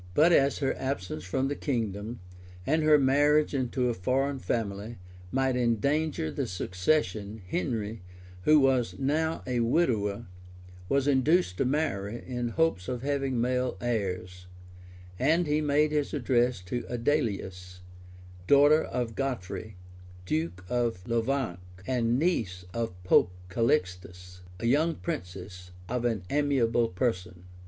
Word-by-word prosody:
] -, -, -19 dB
But 160 Hz, +4 st, +5 dB
as 140 Hz, -2 st, +4 dB
her 135 Hz, -2 st, 0 dB
absence 130 Hz, -12 st, -3 dB
from 130 Hz, +9 st, -1 dB
the 145 Hz, -, -2 dB
kingdom, 115 Hz, -, -3 dB, 0.4 s
and 155 Hz, +6 st, +2 dB
her 155 Hz, -1 st, +6 dB
marriage 145 Hz, +3 st, +3 dB
into 125 Hz, -1 st, 0 dB
a 120 Hz, -, +1 dB
foreign 135 Hz, +7 st, 0 dB
family, 110 Hz, -1 st, -3 dB, 0.3 s
might 135 Hz, -1 st, +1 dB
endanger 125 Hz, -, 0 dB
the -, -, -2 dB
succession, 100 Hz, -, -1 dB
Henry, 105 Hz, +4 st, -2 dB, 0.4 s
who 155 Hz, +10 st, +5 dB
was 130 Hz, -3 st, +2 dB
now 160 Hz, +4 st, 0 dB
a 125 Hz, -1 st, -1 dB
widower, 115 Hz, -6 st, +1 dB, 0.6 s
was 140 Hz, 0 st, +2 dB
induced 145 Hz, -, +3 dB
to -, -, +1 dB
marry, 120 Hz, -7 st, -1 dB
in 125 Hz, -1 st, -3 dB
hopes 120 Hz, -, 0 dB
of 125 Hz, -1 st, -4 dB
having 135 Hz, -3 st, -1 dB
male 125 Hz, +1 st, 0 dB
heirs; 95 Hz, -6 st, -3 dB, 0.7 s
and 160 Hz, +6 st, +3 dB
he 150 Hz, 0 st, +1 dB
made 150 Hz, +1 st, +2 dB
his 150 Hz, 0 st, -1 dB
addresses 120 Hz, -6 st, +1 dB
to 120 Hz, +7 st, -3 dB
Adelais, 100 Hz, -9 st, -2 dB, 0.7 s
daughter 145 Hz, +2 st, +6 dB
of 120 Hz, -2 st, -3 dB
Godfrey, 110 Hz, -5 st, -4 dB, 0.5 s
duke 85 Hz, +2 st, -2 dB
of 115 Hz, -4 st, -1 dB
Lovainc, 115 Hz, -4 st, -1 dB, 0.3 s
and 120 Hz, -2 st, +1 dB
niece 110 Hz, -, -1 dB
of 115 Hz, -5 st, -3 dB
Pope 90 Hz, 0 st, +4 dB, 0.2 s
Calixtus, 90 Hz, -6 st, -1 dB, 0.2 s
a 115 Hz, -, -4 dB
young 155 Hz, +7 st, +2 dB
princess 90 Hz, +1 st, -6 dB, 0.2 s
of 125 Hz, +2 st, -2 dB
an 110 Hz, -5 st, 0 dB
amiable 130 Hz, -5 st, +2 dB
person. 90 Hz, -4 st, -2 dB
120 Hz, 130 wpm, -28 LUFS, 100-140 Hz, 0.7 s, her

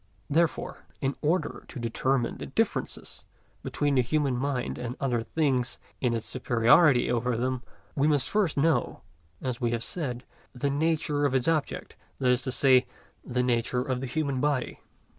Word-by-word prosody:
Therefore, 165 Hz, +2 st, 0 dB
in 135 Hz, 0 st, -1 dB
order 165 Hz, +5 st, 0 dB
to -, -, -8 dB
determine 120 Hz, +2 st, 0 dB
the -, -, -5 dB
differences -, -, -2 dB, 0.4 s
between 145 Hz, -1 st, 0 dB
the 130 Hz, -, +4 dB
human 140 Hz, +1 st, 0 dB
mind 130 Hz, -1 st, -2 dB
and 125 Hz, 0 st, -4 dB
other 125 Hz, -4 st, 0 dB
things 130 Hz, -2 st, 0 dB, 0.2 s
and 120 Hz, -2 st, +1 dB
its 115 Hz, -, -3 dB
superiority 125 Hz, +3 st, +4 dB
over 120 Hz, 0 st, 0 dB
them, 130 Hz, +1 st, -1 dB, 0.3 s
we 145 Hz, +1 st, +2 dB
must 145 Hz, -2 st, +2 dB
first 200 Hz, -6 st, +1 dB
know, 145 Hz, -3 st, +1 dB, 0.4 s
as 125 Hz, -2 st, -3 dB
we 120 Hz, -, +2 dB
have 115 Hz, 0 st, -1 dB
said, 125 Hz, -7 st, -3 dB, 0.3 s
the 140 Hz, +3 st, 0 dB
nature 150 Hz, -1 st, 0 dB
of 140 Hz, -2 st, +2 dB
its 125 Hz, -2 st, +2 dB
object, 160 Hz, -3 st, -1 dB, 0.2 s
that 130 Hz, -, +1 dB
is 125 Hz, 0 st, +2 dB
to 130 Hz, -, -2 dB
say, 130 Hz, -1 st, +4 dB, 0.4 s
the 125 Hz, 0 st, -1 dB
nature 125 Hz, 0 st, +1 dB
of 130 Hz, -1 st, -2 dB
the 135 Hz, -, -3 dB
human 140 Hz, -1 st, -1 dB
body. 145 Hz, -4 st, 0 dB
130 Hz, 165 wpm, -28 LUFS, 125-145 Hz, 0.4 s, the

